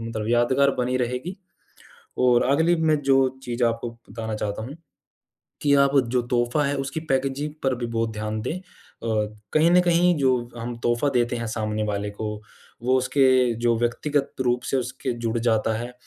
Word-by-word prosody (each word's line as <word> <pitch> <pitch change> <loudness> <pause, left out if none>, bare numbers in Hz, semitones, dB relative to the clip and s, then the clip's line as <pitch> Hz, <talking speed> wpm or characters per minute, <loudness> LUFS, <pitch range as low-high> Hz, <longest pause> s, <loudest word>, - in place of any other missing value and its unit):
मतलब 115 -1 -4
यादगार 120 +4 +3
बनी 125 +1 0
रहेगी। 125 - -3 0.8
और 125 -1 +4
अगली 160 +6 +3
मैं 155 -2 +2
जो 135 -1 +4 0.3
चीज़ 120 0 -3
आपको 115 0 -1 0.2
बताना 110 +1 -5
चाहता 105 +1 -3
हूँ 135 +6 -7 0.9
कि 145 -1 +3
आप 140 - +2 0.2
जो 125 0 +1
तोहफ़ा 120 +4 +1
है 140 +1 0
उसकी 140 +4 -3
पैकेजिंग 135 +3 -1
पर 135 -1 +1
भी 120 -1 -4
बहुत 115 -1 -1
ध्यान 110 0 -3
दें 110 - -3
अ, - - -17 0.9
कहीं 160 +2 +4
न 180 - +6
कहीं 175 0 +3
जो 130 -4 +1
हम 120 +1 -5
तोहफ़ा 120 +4 +1
देते 120 0 +1
हैं 115 -1 -3
सामने 110 -1 -2
वाले 105 -1 -2
को, 105 0 -5 0.4
वो 130 +2 +3
उसके 130 -2 +3
जो 120 -1 +3
व्यक्तिगत 135 +4 -1
रूप 125 -1 +1
से 135 - +2
उसके 130 0 -3
जुड़ 115 +1 0
जाता 110 -1 +1
है 120 +2 -5
125 Hz, 175 wpm, -24 LUFS, 115-135 Hz, 0.9 s, न